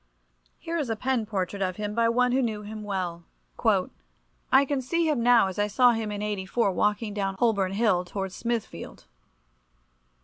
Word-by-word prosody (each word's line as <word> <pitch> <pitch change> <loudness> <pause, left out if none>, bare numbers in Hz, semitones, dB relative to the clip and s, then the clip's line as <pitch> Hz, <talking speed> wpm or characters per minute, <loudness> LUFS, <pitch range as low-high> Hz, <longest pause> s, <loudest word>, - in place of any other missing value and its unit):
Here 335 0 -3
is 280 -6 -2
a 225 - 0
pen 250 -1 -1
portrait 195 -1 -3
of 185 -1 -1
him 210 +1 -4
by 230 +1 +2
one 250 +1 +2
who 260 +2 +2
knew 215 -4 -2
him 215 +1 -7
well— 180 -4 -3 1.3
"I 265 +2 +6
can 275 -1 -1
see 335 +6 0
him 295 -6 +1
now 240 -2 +5
as 190 +1 -4
I 205 - +2
saw 245 +4 +5
him 225 -2 -2
in 205 0 -4
'84 205 +1 0
walking 210 +2 0
down 195 -2 -2
Holborn 200 -4 +1
Hill, 200 -4 +2
towards 190 +1 -5
Smithfield. 235 -2 -4
215 Hz, 175 wpm, -26 LUFS, 195-240 Hz, 1.3 s, I